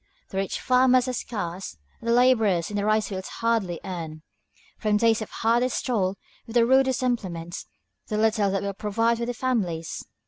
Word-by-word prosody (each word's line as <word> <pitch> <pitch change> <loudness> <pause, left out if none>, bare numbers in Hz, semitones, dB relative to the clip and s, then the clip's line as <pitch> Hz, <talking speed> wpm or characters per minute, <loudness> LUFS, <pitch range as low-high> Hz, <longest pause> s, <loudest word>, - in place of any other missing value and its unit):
The 190 - -6
rich 195 0 -1
farmers 255 0 +4
are 255 - -1
scarce, 190 - -5 0.2
and 230 - -4
the - - +4
laborers 225 -8 +3
in - - -4
the 205 - 0
rice 215 0 +2
fields 190 -2 -5
hardly 225 -7 -1
earn, 160 -4 -6 0.6
from 210 -1 +2
days 225 0 +3
of 215 - -5
hardest 235 +2 +1
toil 200 -6 0 0.3
with 230 - -9
the 235 -1 +5
rudest 260 0 +3
implements, 180 -8 -3 0.4
the 210 - -2
little 215 -2 +2
that 195 +1 -1
will 200 0 -2
provide 225 +3 0
for 235 - -1
their 245 - -2
families. 190 -11 -2
215 Hz, 180 wpm, -25 LUFS, 190-240 Hz, 0.6 s, the